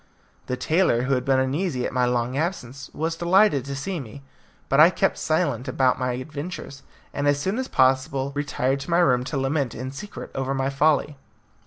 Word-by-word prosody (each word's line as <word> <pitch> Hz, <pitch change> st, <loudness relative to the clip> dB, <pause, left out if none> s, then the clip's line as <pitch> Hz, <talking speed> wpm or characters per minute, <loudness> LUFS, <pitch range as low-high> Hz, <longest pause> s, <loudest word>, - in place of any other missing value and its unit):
The 125 Hz, -, -2 dB
tailor, 140 Hz, -3 st, +2 dB
who 135 Hz, +2 st, 0 dB
had 125 Hz, -1 st, 0 dB
been 135 Hz, -1 st, +3 dB
uneasy 130 Hz, 0 st, -1 dB
at -, -, -4 dB
my 125 Hz, -1 st, +2 dB
long 125 Hz, +1 st, -1 dB
absence, 140 Hz, -5 st, -4 dB
was, 165 Hz, +2 st, -2 dB
delighted 175 Hz, -4 st, +3 dB
to 140 Hz, 0 st, -5 dB
see 175 Hz, +6 st, -4 dB
me; 135 Hz, +1 st, -10 dB, 0.4 s
but 135 Hz, -, +2 dB
I 160 Hz, +3 st, +9 dB
kept 195 Hz, +1 st, 0 dB
silence 155 Hz, -5 st, 0 dB
about 130 Hz, 0 st, +1 dB
my 125 Hz, -1 st, -1 dB
adventure, 150 Hz, +6 st, -6 dB, 0.4 s
and 145 Hz, 0 st, -1 dB
as 145 Hz, 0 st, +3 dB
soon 190 Hz, -, -1 dB
as 260 Hz, -, -2 dB
possible 130 Hz, -, +1 dB
retired 140 Hz, -2 st, -1 dB
to 140 Hz, -, -8 dB
my 170 Hz, -, +3 dB
room 125 Hz, -8 st, +3 dB
to 145 Hz, -, -3 dB
lament 135 Hz, -2 st, -1 dB
in 130 Hz, +2 st, -5 dB
secret 175 Hz, +10 st, -8 dB
over 135 Hz, 0 st, -2 dB
my 135 Hz, 0 st, -1 dB
folly. 150 Hz, 0 st, +1 dB
140 Hz, 195 wpm, -24 LUFS, 130-160 Hz, 0.4 s, I